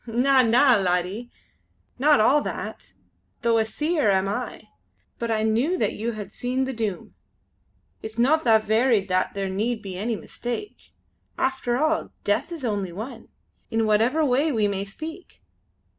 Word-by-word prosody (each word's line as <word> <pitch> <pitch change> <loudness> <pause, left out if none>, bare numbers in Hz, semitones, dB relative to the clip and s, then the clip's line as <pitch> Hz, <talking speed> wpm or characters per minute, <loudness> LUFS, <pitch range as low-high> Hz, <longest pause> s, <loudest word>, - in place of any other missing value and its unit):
"Na! 260 +4 +4
na! 245 +1 +5
laddie. 185 +5 -1 0.7
Not 295 +2 +5
all 275 +7 +4
that, - - -6 0.5
though 230 -1 +3
a 220 - +2
Seer 300 +1 0
am 190 0 +2
I; 225 +4 -4 0.6
but 235 - -2
I 220 -1 +1
knew 240 +12 +1
that - - 0
you 230 +2 -3
had 210 -2 -7
seen 255 +2 -1
the 265 0 -3
Doom! 215 -6 -4 0.9
It's 220 +1 -7
no 255 +6 +4
that 225 -7 +3
varied 220 -2 +2
that 185 +1 0
there 195 -1 -2
need 220 +4 -2
be 185 -2 -6
any 225 +3 -1
mistake. 245 - -7 0.5
After 260 -2 0
all 310 +3 +1
Death 230 +11 0
is 320 -6 -5
only 200 -5 -2
one, 225 +6 -8 0.4
in 225 -1 +1
whatever 230 +9 +3
way 280 +4 +2
we 220 -5 +2
may 200 -1 -2
speak!" 315 - -9
230 Hz, 160 wpm, -24 LUFS, 210-265 Hz, 0.9 s, na